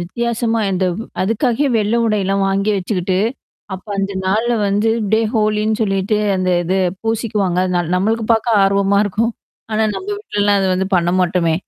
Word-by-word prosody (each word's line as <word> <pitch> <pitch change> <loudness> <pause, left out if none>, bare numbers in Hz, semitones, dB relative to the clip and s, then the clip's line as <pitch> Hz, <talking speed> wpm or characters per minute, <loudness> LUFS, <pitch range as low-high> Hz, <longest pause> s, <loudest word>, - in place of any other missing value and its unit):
வித்தியாசமா 230 +5 -1
அந்த 185 0 0 0.4
அதுக்காகவே 235 +7 0
வெள்ளை 215 +2 +1
உடை 215 -2 +1
எல்லாம் 195 +1 0
வாங்கி 195 +2 0
வச்சுக்கிட்டு, 185 -1 -1 0.6
அப்போ 190 +3 -11
அந்த 195 0 -1
நாள்ல 225 +5 +1 0.2
வந்து 205 +3 +1 0.2
டே 220 - +4
ஹோலின்னு 215 0 +1
சொல்லிட்டு, 195 +1 0 0.2
அந்தது 185 0 0 0.2
பூசிக்குவாங்க. 210 -5 -1
ந - - +2 0.2
நம்மளுக்கு 220 +5 0
பார்க்க 225 -2 +2
ஆர்வமா 200 0 +2
இருக்கும். 225 +4 -1 0.4
ஆனா 215 +1 +1
நம்ம 380 - -6
வீட்லல்லாம் 205 - 0 0.2
அத 190 - 0
பண்ண 175 0 +1
மாட்டோமே. 170 -2 +1
205 Hz, 145 wpm, -18 LUFS, 190-225 Hz, 0.6 s, டே